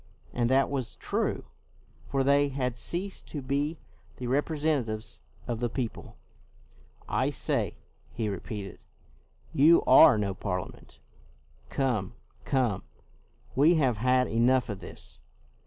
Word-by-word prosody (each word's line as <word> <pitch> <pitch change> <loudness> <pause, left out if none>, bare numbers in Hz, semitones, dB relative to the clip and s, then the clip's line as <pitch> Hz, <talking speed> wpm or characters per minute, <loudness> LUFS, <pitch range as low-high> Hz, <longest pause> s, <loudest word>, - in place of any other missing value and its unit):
And 120 -1 +1
that 135 +2 +3
was 130 -4 -3
true, - - -2 0.6
for 135 -1 +1
they 140 +1 +4
had 130 -3 -2
ceased 180 +10 -3
to 150 - -5
be 140 +4 -1 0.4
the 125 - -6
representatives 135 -5 -1 0.2
of 120 -2 -3
the 120 0 -1
people. 120 -1 -5 0.5
" - - -29 0.2
I - - +1
say," - - -1 0.3
he 115 -2 -3
repeated, 100 -1 -6 0.4
" - - -33
you 170 +2 +7
are 130 -4 +8
no 100 -2 -1
Parliament. 90 -2 -5 0.7
Come, 120 -9 -1 0.3
come, 125 -8 0 0.7
we 155 +6 +5
have 130 -8 +2
had 125 +3 +3
enough 125 +2 +2
of 100 -3 -4
this. - - -10
125 Hz, 125 wpm, -28 LUFS, 110-140 Hz, 0.7 s, are